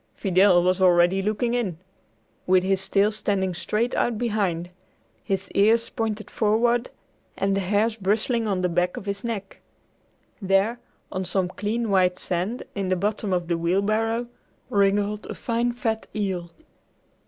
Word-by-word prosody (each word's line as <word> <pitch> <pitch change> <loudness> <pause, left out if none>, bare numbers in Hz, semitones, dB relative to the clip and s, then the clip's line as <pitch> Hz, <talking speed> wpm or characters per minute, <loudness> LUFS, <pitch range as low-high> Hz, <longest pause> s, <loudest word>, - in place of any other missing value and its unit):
Fidel 185 -2 +4
was 185 +1 +1
already 180 +1 +4
looking 215 +4 0
in, 215 -9 -1 0.7
with 185 0 +4
his 190 0 0
tail 205 +1 +3
standing 190 -3 -1
straight 215 +7 -1
out 235 -2 0
behind, 200 -7 -1 0.5
his 195 -2 -3
ears 225 +3 +3
pointed 220 -3 -3
forward, 235 +3 +1 0.5
and 195 0 +1
the - - +1
hairs 210 +4 +1
bristling 220 +3 0
on 190 -3 -1
the - - +3
back 180 +1 0
of - - -7
his 200 0 -4
neck. 210 -4 -5 0.8
There, 195 +5 +2 0.3
on 185 0 -2
some 185 0 0
clean 215 +3 -2
white 180 -2 +3
sand 185 +7 -3
in 195 -2 -2
the 185 - +2
bottom 205 +2 -2
of 175 -2 0
the 170 -1 0
wheelbarrow, 215 +7 +1 0.5
wriggled 205 +1 +1
a - - -6
fine 235 +1 -1
fat 225 -2 -2
eel! 190 -5 -2
200 Hz, 150 wpm, -24 LUFS, 185-220 Hz, 0.8 s, Fidel